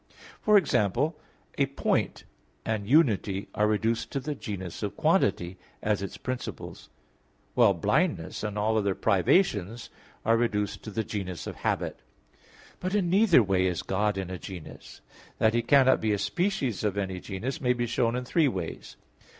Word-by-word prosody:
For 210 -1 +5
example, 150 - +1 0.4
a 140 - +3
point 135 - -1 0.4
and 110 -2 -2
unity 110 - +2
are 105 - +2
reduced 110 +2 0
to 140 - 0
the 150 +3 -3
genus 95 - -6
of - - -3
quantity, 90 +1 +1 0.2
as 105 -2 +1
its 100 - -5
principles; 130 -1 -6 0.6
while - - +5
blindness - - 0
and 105 0 -3
all 110 +1 +2
other 100 -2 0
privations 110 - +1 0.3
are 115 +1 +4
reduced 105 -3 -1
to - - -5
the 110 +2 -2
genus 95 -5 -5
of - - -6
habit. - - -2 0.8
But 185 +2 -2
in 180 -4 +1
neither 190 - +6
way 95 -2 +2
is 90 -2 -2
God 105 +1 0
in 95 -1 -4
a 90 - -5
genus. 90 -5 -10 0.4
That 110 0 +3
He 120 - +2
cannot 130 0 +4
be 110 -1 +1
a - - +1
species 170 - -1
of 105 -2 -1
any 95 -2 -2
genus 105 +8 -5
may 125 -2 +3
be 120 -1 -1
shown 120 0 0
in 125 0 -3
three 155 +3 +3
ways. 95 -10 -5
110 Hz, 165 wpm, -27 LUFS, 100-130 Hz, 0.8 s, neither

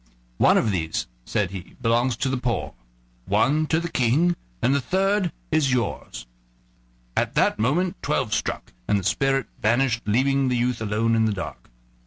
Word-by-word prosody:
"One - - +5
of 110 - +2
these," 80 -4 -2 0.2
said 95 +4 -1
he, 95 -3 -9
"belongs 120 0 +1
to 130 - 0
the 135 - 0
poor, 120 -5 -2 0.5
one 155 +3 +2
to 160 - +2
the 170 - -3
King, 155 +6 +2 0.2
and 130 - +2
the 140 - +2
third 190 +4 +1 0.2
is 150 -4 +2
yours." 125 - -2 0.9
At - - 0
that - - +2
moment 170 - 0
twelve 135 -7 -1
struck, - - -3
and 105 - +3
the 100 - -3
spirit 135 +6 +1 0.2
vanished, 115 +1 +2
leaving 135 +5 +2
the 125 -1 +1
youth 120 -1 0
alone 110 +2 +1
in 110 -1 +3
the 110 - +1
dark. 95 -3 -7
125 Hz, 170 wpm, -24 LUFS, 110-140 Hz, 0.9 s, One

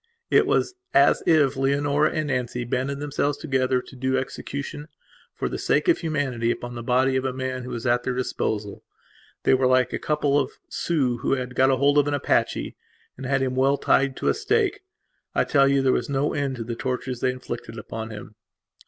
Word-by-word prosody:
It - - +5
was - - +1 0.2
as 140 +1 +5
if 150 -5 +4
Leonora 140 +2 +2
and 155 -1 -2
Nancy 125 -2 -2
banded 130 +3 -2
themselves 145 0 -1
together 130 -4 0
to - - -14
do 130 +1 0
execution, 140 +2 -5 0.5
for - - -2
the - - -4
sake - - +1
of 345 - +4
humanity, 140 -8 -1
upon 120 0 -3
the 120 - -6
body 130 +2 +2
of 130 - +1
a 130 - -1
man 130 0 -3
who 125 - -7
was 115 0 -5
at 120 0 +3
their 125 +1 -2
disposal. 105 -5 -3 0.6
They - - +4
were 130 0 +3
like 130 0 +3
a - - -1
couple 145 -2 +1
of 135 - -2 0.2
Sioux 135 -8 0
who 120 - 0
had 125 -1 -5
got 130 +1 +4
hold 140 +2 +4
of 145 - +2
an 145 - +1
Apache 140 - 0 0.4
and 130 0 -7
had 135 0 +1
him 130 -1 -1
well 135 +2 +2
tied 135 -1 +2
to - - -2
a - - +4
stake. 425 -2 0 0.6
I - - +3
tell 140 -2 +4
you 140 0 +2
there 130 - +3
was - - -1
no 140 +1 0
end 140 -2 -1
to 120 - -5
the 115 +1 -5
tortures 125 0 -3
they 130 - +1
inflicted 125 -2 -6
upon 110 +1 -6
him. 105 0 -9
130 Hz, 205 wpm, -24 LUFS, 125-140 Hz, 0.6 s, It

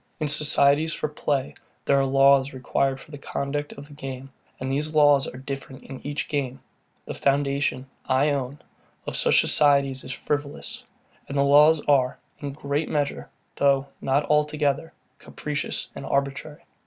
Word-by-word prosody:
In 155 - -1
societies 150 +1 +3
for - - -2
play, 145 -2 -2 0.3
there 140 - +3
are 135 - +2
laws 135 0 +4
required 135 +1 -1
for 155 - -15
the 145 - -9
conduct 145 +1 -3
of 140 +1 -11
the 145 - -14
game; 135 -1 -8 0.3
and 130 +1 -3
these 150 +3 -2
laws 145 -2 +5
are 125 - -8
different 135 0 -7
in 135 -1 -9
each 145 0 -3
game. 135 -3 -3 0.5
The - - -5
foundation, 140 -1 0 0.2
I 135 +3 +2
own, 140 0 -4 0.4
of - - -5
such - - +4
societies 140 -3 +3
is - - -7
frivolous; 145 +1 -4 0.5
and 140 - -3
the 140 - +4
laws 150 +2 +6
are, 135 -3 +2 0.2
in 145 - -5
a - - -4
great 145 +2 -3
measure, 145 -1 -2 0.3
though 140 0 +2
not 135 +2 +1
altogether, 150 0 +1 0.3
capricious 150 -1 -4
and - - -8
arbitrary. 140 +3 -2
140 Hz, 160 wpm, -25 LUFS, 135-145 Hz, 0.5 s, laws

